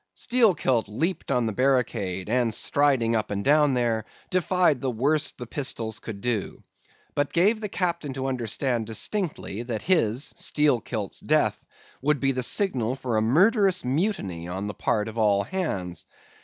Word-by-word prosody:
"Steelkilt 180 Hz, -, +2 dB
leaped 160 Hz, -, -2 dB
on 125 Hz, -1 st, +2 dB
the 110 Hz, -, -1 dB
barricade, 115 Hz, -8 st, 0 dB
and 120 Hz, 0 st, +1 dB
striding 135 Hz, -6 st, +2 dB
up 110 Hz, -2 st, -1 dB
and 100 Hz, 0 st, -3 dB
down 145 Hz, -1 st, +4 dB
there, 115 Hz, -3 st, 0 dB, 0.3 s
defied 180 Hz, -6 st, +2 dB
the 135 Hz, -, -1 dB
worst 140 Hz, +6 st, 0 dB
the 125 Hz, -, -6 dB
pistols 115 Hz, -3 st, -2 dB
could 100 Hz, -3 st, -8 dB
do; 120 Hz, -5 st, -2 dB, 0.5 s
but 145 Hz, 0 st, 0 dB
gave 205 Hz, +6 st, +2 dB
the 210 Hz, -, -3 dB
captain 170 Hz, -6 st, -2 dB
to 130 Hz, 0 st, -4 dB
understand 120 Hz, -2 st, -1 dB
distinctly, 145 Hz, -, -2 dB
that 120 Hz, -3 st, -4 dB
his 135 Hz, -, +1 dB
(Steelkilt's) 120 Hz, -8 st, 0 dB
death -, -, +1 dB, 0.4 s
would 150 Hz, +1 st, +1 dB
be 135 Hz, +1 st, +2 dB
the 130 Hz, -1 st, -2 dB
signal 125 Hz, -, +1 dB
for 125 Hz, -3 st, -3 dB
a 110 Hz, -, +2 dB
murderous 185 Hz, -, +3 dB
mutiny 125 Hz, -, -1 dB
on 95 Hz, +3 st, -4 dB
the 105 Hz, -, -4 dB
part 105 Hz, 0 st, -1 dB
of 110 Hz, +1 st, -5 dB
all 100 Hz, -2 st, +3 dB
hands. 100 Hz, -, -4 dB
125 Hz, 155 wpm, -25 LUFS, 110-150 Hz, 0.5 s, down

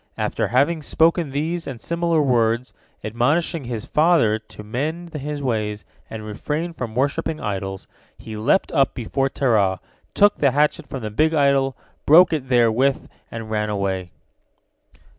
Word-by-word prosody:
After -, -, -1 dB
having 140 Hz, -, +2 dB
spoken 165 Hz, +1 st, +2 dB
these 160 Hz, +5 st, -3 dB
and 130 Hz, -4 st, -6 dB
similar 170 Hz, +2 st, 0 dB
words, 120 Hz, -1 st, +1 dB, 0.3 s
admonishing 140 Hz, +8 st, 0 dB
his 115 Hz, -3 st, -5 dB
father 150 Hz, -9 st, +3 dB
to 110 Hz, -1 st, -13 dB
mend 155 Hz, +10 st, -4 dB
his 150 Hz, -1 st, -4 dB
ways 105 Hz, -4 st, -2 dB, 0.2 s
and 110 Hz, -1 st, -7 dB
refrain 150 Hz, +10 st, -4 dB
from 120 Hz, -8 st, -6 dB
worshipping 140 Hz, +4 st, -1 dB
idols, 95 Hz, -4 st, -4 dB, 0.3 s
he 110 Hz, -, -9 dB
leapt 125 Hz, -, +1 dB
up 135 Hz, -1 st, +2 dB
before 135 Hz, +3 st, -1 dB
Terah, 105 Hz, -9 st, +1 dB, 0.4 s
took 205 Hz, 0 st, +4 dB
the 140 Hz, -, +3 dB
hatchet 150 Hz, +2 st, +1 dB
from 130 Hz, -4 st, -6 dB
the 105 Hz, -, -4 dB
big 155 Hz, +8 st, +2 dB
idol, 140 Hz, -3 st, +2 dB, 0.3 s
broke 165 Hz, +3 st, +7 dB
it 135 Hz, -5 st, -3 dB
therewith, 125 Hz, +2 st, +2 dB, 0.2 s
and 115 Hz, -1 st, -7 dB
ran 105 Hz, -1 st, -1 dB
away. 95 Hz, -3 st, -2 dB
135 Hz, 145 wpm, -22 LUFS, 110-155 Hz, 0.4 s, broke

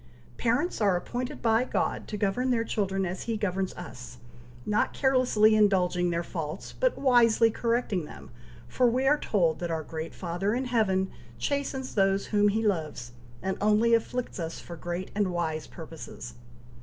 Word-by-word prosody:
Parents 245 Hz, +6 st, 0 dB
are 200 Hz, -4 st, +4 dB
appointed 245 Hz, +8 st, -5 dB
by 225 Hz, +1 st, +4 dB
God -, -, -2 dB
to 210 Hz, -, -4 dB
govern 210 Hz, +6 st, 0 dB
their 235 Hz, -2 st, +2 dB
children 195 Hz, -4 st, -1 dB
as 185 Hz, +1 st, -4 dB
he 230 Hz, -1 st, -1 dB
governs 190 Hz, -2 st, -1 dB
us, 125 Hz, -7 st, -9 dB, 0.5 s
not 210 Hz, 0 st, +1 dB
carelessly 250 Hz, -5 st, +4 dB
indulging 180 Hz, -4 st, +3 dB
their 170 Hz, 0 st, -1 dB
faults, 155 Hz, -3 st, -5 dB
but -, -, +1 dB
wisely 235 Hz, -4 st, +4 dB
correcting 230 Hz, -7 st, 0 dB
them, -, -, -12 dB, 0.4 s
for 245 Hz, -, +3 dB
we 255 Hz, +3 st, 0 dB
are 295 Hz, +2 st, +4 dB
told 170 Hz, -7 st, +1 dB
that 175 Hz, -, -3 dB
our 160 Hz, -1 st, -2 dB
Great 160 Hz, +1 st, -6 dB
Father 185 Hz, +4 st, -1 dB
in 260 Hz, +2 st, -1 dB
heaven 195 Hz, -6 st, +1 dB, 0.3 s
chastens 275 Hz, -2 st, -2 dB
those 195 Hz, -1 st, +2 dB
whom 205 Hz, -1 st, +3 dB
he 220 Hz, +2 st, +1 dB
loves, 155 Hz, -, -2 dB, 0.3 s
and 190 Hz, 0 st, -1 dB
only 215 Hz, +3 st, +4 dB
afflicts 235 Hz, -1 st, -1 dB
us 165 Hz, -1 st, -4 dB
for 170 Hz, -, -9 dB
great 175 Hz, +3 st, -5 dB
and 205 Hz, -3 st, 0 dB
wise 160 Hz, -3 st, -2 dB
purposes. 160 Hz, -7 st, -9 dB
205 Hz, 165 wpm, -28 LUFS, 175-235 Hz, 0.5 s, are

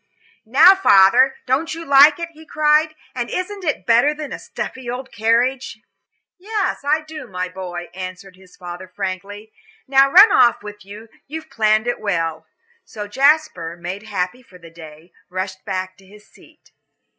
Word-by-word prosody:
"Now, 300 Hz, -, +7 dB
father, 255 Hz, -, +4 dB
don't 280 Hz, +6 st, -1 dB
you 330 Hz, 0 st, -8 dB
like 285 Hz, +1 st, +6 dB
it?" 335 Hz, 0 st, -5 dB
he 315 Hz, 0 st, -16 dB
cried. 310 Hz, 0 st, +1 dB, 0.2 s
"And 240 Hz, -2 st, -4 dB
isn't 390 Hz, +2 st, -5 dB
it 305 Hz, -4 st, -2 dB
better 240 Hz, +6 st, +3 dB
than 300 Hz, -2 st, -7 dB
a -, -, -7 dB
stuffy 260 Hz, -2 st, -7 dB
old 255 Hz, +2 st, -6 dB
carriage?" 235 Hz, +2 st, 0 dB, 0.6 s
"Yes, 410 Hz, 0 st, -2 dB
I 300 Hz, +2 st, +1 dB
do, 310 Hz, 0 st, -10 dB
my 180 Hz, -1 st, -4 dB
boy," 180 Hz, -1 st, -7 dB
answered 185 Hz, +1 st, -9 dB
his 185 Hz, -1 st, -20 dB
father, 180 Hz, 0 st, -9 dB
frankly. 200 Hz, +2 st, -7 dB, 0.4 s
"Now 270 Hz, 0 st, +4 dB
run 395 Hz, +5 st, +8 dB
off 235 Hz, -, +3 dB
with 210 Hz, -1 st, -10 dB
you, 205 Hz, +3 st, -12 dB, 0.2 s
you've 315 Hz, +1 st, -8 dB
planned 215 Hz, 0 st, +1 dB
it 245 Hz, 0 st, -2 dB
well." 165 Hz, -6 st, -3 dB, 0.4 s
So 210 Hz, -1 st, -8 dB
Jasper, 265 Hz, -, +1 dB
made 180 Hz, +3 st, -6 dB
happy 205 Hz, +2 st, -4 dB
for 195 Hz, -7 st, -18 dB
the 165 Hz, -2 st, -15 dB
day, 160 Hz, 0 st, -14 dB, 0.2 s
rushed 190 Hz, +1 st, -5 dB
back 185 Hz, -2 st, -4 dB
to 195 Hz, -, -21 dB
his 210 Hz, +2 st, -17 dB
seat. -, -, -23 dB
220 Hz, 165 wpm, -19 LUFS, 185-295 Hz, 0.6 s, run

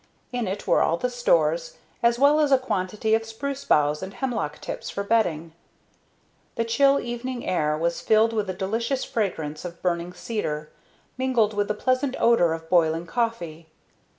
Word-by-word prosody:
In 245 Hz, -4 st, -2 dB
it 195 Hz, +2 st, -4 dB
were -, -, +3 dB
all 165 Hz, -, +2 dB
the 250 Hz, +7 st, -2 dB
stores, -, -, +1 dB, 0.2 s
as 235 Hz, -1 st, +3 dB
well 285 Hz, +4 st, +5 dB
as 295 Hz, -2 st, +2 dB
a 270 Hz, -, +7 dB
quantity 215 Hz, -3 st, -1 dB
of 225 Hz, 0 st, +3 dB
spruce 270 Hz, +5 st, -5 dB
boughs 150 Hz, 0 st, +2 dB
and 190 Hz, +1 st, -7 dB
hemlock 190 Hz, -, -3 dB
tips -, -, -6 dB
for 200 Hz, -, -3 dB
bedding. 170 Hz, -7 st, 0 dB, 1.0 s
The 230 Hz, -, 0 dB
chill 275 Hz, +5 st, +4 dB
evening 240 Hz, +1 st, -5 dB
air 150 Hz, -4 st, +1 dB
was 170 Hz, +2 st, -1 dB
filled 220 Hz, +1 st, +3 dB
with 210 Hz, -3 st, -1 dB
a -, -, -1 dB
delicious 225 Hz, +8 st, -1 dB
fragrance 160 Hz, -8 st, -3 dB
of 175 Hz, -1 st, -7 dB
burning 175 Hz, 0 st, -1 dB
cedar, 155 Hz, -10 st, -4 dB, 0.5 s
mingled 245 Hz, -5 st, +2 dB
with 205 Hz, 0 st, 0 dB
the 210 Hz, -, -1 dB
pleasant 255 Hz, +4 st, 0 dB
odor 230 Hz, -8 st, +4 dB
of 160 Hz, 0 st, -7 dB
boiling 165 Hz, -1 st, +2 dB
coffee. 170 Hz, -7 st, -3 dB
215 Hz, 170 wpm, -25 LUFS, 170-245 Hz, 1.0 s, a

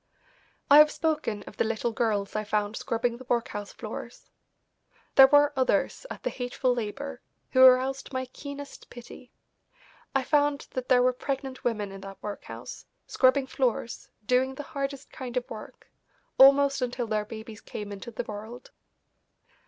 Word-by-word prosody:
I 290 Hz, +1 st, +9 dB
have 300 Hz, 0 st, +8 dB
spoken 300 Hz, -11 st, -1 dB
of 205 Hz, -, -13 dB
the -, -, +2 dB
little 225 Hz, +1 st, -1 dB
girls 215 Hz, -3 st, -1 dB
I 215 Hz, -, 0 dB
found 210 Hz, 0 st, -1 dB
scrubbing 235 Hz, +1 st, -1 dB
the 260 Hz, -, -11 dB
workhouse 225 Hz, -4 st, -2 dB
floors. -, -, -9 dB, 0.8 s
There 270 Hz, -1 st, +9 dB
were 290 Hz, +1 st, +5 dB
others 265 Hz, -, 0 dB
at -, -, -8 dB
the -, -, -1 dB
hateful 250 Hz, 0 st, -1 dB
labour 245 Hz, +4 st, -5 dB, 0.3 s
who 260 Hz, -, +4 dB
aroused 260 Hz, +2 st, +5 dB
my 260 Hz, -1 st, -2 dB
keenest 280 Hz, +2 st, -9 dB
pity. 245 Hz, +1 st, -12 dB, 0.8 s
I 270 Hz, -, +2 dB
found 290 Hz, 0 st, +1 dB
that 255 Hz, -1 st, -5 dB
there 250 Hz, -1 st, +5 dB
were 255 Hz, 0 st, +3 dB
pregnant 265 Hz, 0 st, -4 dB
women 210 Hz, -4 st, -1 dB
in 195 Hz, 0 st, -9 dB
that 195 Hz, 0 st, -9 dB
workhouse, 210 Hz, -1 st, -8 dB, 0.2 s
scrubbing 260 Hz, +1 st, +3 dB
floors, 250 Hz, -3 st, -2 dB, 0.2 s
doing 255 Hz, +3 st, +2 dB
the 290 Hz, -, -6 dB
hardest 275 Hz, 0 st, -5 dB
kind 250 Hz, -1 st, -6 dB
of 245 Hz, -, -2 dB
work, 215 Hz, -, -10 dB, 0.5 s
almost 275 Hz, 0 st, +6 dB
until 245 Hz, -1 st, -2 dB
their 215 Hz, -1 st, -1 dB
babies 220 Hz, 0 st, -9 dB
came 205 Hz, -1 st, -7 dB
into 200 Hz, +3 st, -7 dB
the 225 Hz, -, -4 dB
world. 220 Hz, +4 st, -9 dB
250 Hz, 155 wpm, -27 LUFS, 220-270 Hz, 0.8 s, I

